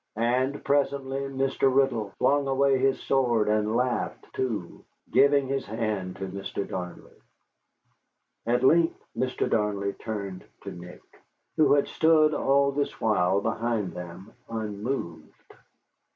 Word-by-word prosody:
And 125 +5 0
presently 140 -1 0
Mr. 135 0 0
Riddle 130 -6 +1
flung 140 0 +2
away 135 0 +2
his 135 0 +2
sword, 120 -5 +1
and 105 +1 +1
laughed, 125 0 -1
too, 110 -9 -4 0.3
giving 140 0 +4
his 135 0 -1
hand 105 -4 -3
to 95 - -5
Mr. 100 +1 -5
Darnley. 90 -1 -7 1.3
At 120 +2 +1
length 165 +4 +4 0.2
Mr. 130 0 -1
Darnley 100 -2 0
turned 100 -4 -6 0.2
to - - -6
Nick, 90 +1 -11 0.5
who 155 -2 +4
had 145 -1 +3
stood 155 -1 +4
all 140 -1 +2
this 140 +1 -3
while 100 -3 +2
behind 115 -2 -1
them, 90 +3 -9 0.2
unmoved. 105 -4 -5
120 Hz, 125 wpm, -26 LUFS, 105-135 Hz, 1.3 s, giving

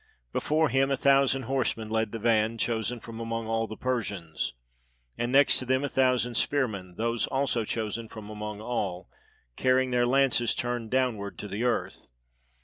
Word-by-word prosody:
Before 155 +1 +2
him 135 +1 +2
a 135 - +1
thousand 135 -1 +3
horsemen 125 -4 -1
led 110 -1 0
the - - -4
van, 115 0 +2
chosen 115 +1 -1
from 115 0 -9
among 115 0 -3
all 115 0 0
the 110 - -8
Persians; 100 - -2 0.6
and 120 +1 -2
next 140 +1 +5
to 130 - -3
them 130 +1 +2
a 145 - -1
thousand 125 -3 +2
spearmen, 105 -11 -1
those 115 +1 0
also 135 -4 0
chosen 110 +1 -3
from 110 -2 -9
among 105 0 -6
all, 100 -6 -3 0.4
carrying 130 0 +2
their 120 0 +3
lances 130 -2 +3
turned 120 -2 -2
downward 120 -6 0
to 105 - -6
the 105 +4 -3
earth. 125 -1 -1
115 Hz, 165 wpm, -28 LUFS, 110-130 Hz, 0.6 s, next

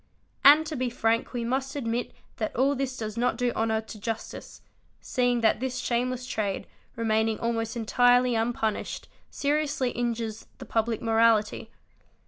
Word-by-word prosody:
And 300 +3 +8
to 310 0 -4
be 255 -1 -1
frank 230 -1 0
we 240 -2 -3
must 265 +3 -2
admit 240 -3 -2 0.3
that 215 - -3
all 270 +4 +3
this 265 -2 -3
does 215 0 -5
not 245 +1 +1
do 245 -1 +1
honour 220 -1 0
to 220 -1 -10
justice 225 +1 -6 0.4
seeing 245 -2 0
that 220 -1 +3
this 255 0 -3
shameless 250 +1 -1
trade, 205 -5 -2 0.3
remaining 220 -1 +1
almost 230 0 -2
entirely 245 +2 +4
unpunished 225 -1 -2 0.2
seriously 290 -3 0
injuries 230 -2 -3
the - - -9
public 225 0 -1
morality. 225 -1 +2
235 Hz, 145 wpm, -27 LUFS, 225-250 Hz, 0.4 s, And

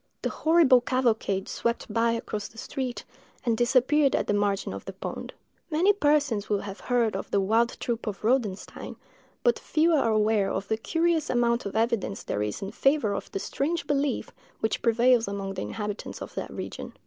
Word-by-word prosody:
The - - 0
horrible 315 -6 +5
cavalcade 230 -6 0
swept 235 0 -2
by 230 0 +2
across 215 -3 -4
the 225 - -19
street, 255 +1 -4 0.4
and 230 -2 +2
disappeared 260 +4 +3
at - - 0
the - - 0
margin 205 - 0
of 100 - -8
the 195 - -6
pond." 190 - -6 0.4
Many 350 +6 +4
persons 290 - +1
will 205 -2 +1
have 200 0 -7
heard 235 -4 +1
of 195 - -4
the 200 - +2
"Wild 225 +5 +1
Troop 235 -1 -3
of 205 -1 -4
Rodenstein," 220 -5 -1 0.5
but 485 -1 +3
few 325 +2 +2
are 275 -7 +3
aware 215 -2 +2
of 195 - -3
the 220 - +1
curious 325 +5 0
amount 235 -2 +1
of 200 - -7
evidence 220 -3 0
there 105 - -2
is 105 - -3
in 195 - -5
favor 270 -3 +2
of - - -5
the - - -3
strange 310 - -2
belief 285 -1 -1 0.3
which 220 - -1
prevails 235 0 +4
among 200 -1 -4
the 190 - -4
inhabitants 210 -2 -5
of - - -8
that - - -4
region. - - -6
230 Hz, 185 wpm, -27 LUFS, 205-270 Hz, 0.5 s, horrible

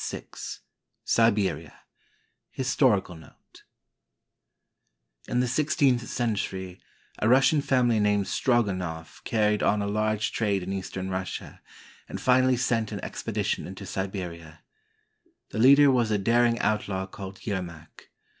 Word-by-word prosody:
VI - - -6 0.8
SIBERIA 100 - +1 0.7
HISTORICAL 115 - +1
NOTE 80 - -18 1.7
In 125 - +1
the 125 - 0
sixteenth 130 -3 +1
century, 95 -6 -3 0.4
a 110 - +2
Russian 135 +4 +5
family 125 -5 +2
named 105 -1 +2
Strogo 120 -3 +1
noff 80 -3 -7
carried 105 -2 +1
on 105 - +2
a 100 - -1
large 110 +1 0
trade 100 -4 0
in 95 +2 -4
eastern 95 0 -5
Russia, 95 0 -5 0.5
and - - -5
finally 130 0 +3
sent 115 -3 0
an 100 - -6
expedition - - -3
into 95 +2 -8
Siberia. 90 -5 -6 0.9
The - - -4
leader 140 +3 +7
was 120 -3 +2
a 105 - +2
daring 115 +3 +2
outlaw 100 -4 -1
called 95 0 -9
Yermak. 85 -6 -6
105 Hz, 120 wpm, -26 LUFS, 95-120 Hz, 1.7 s, leader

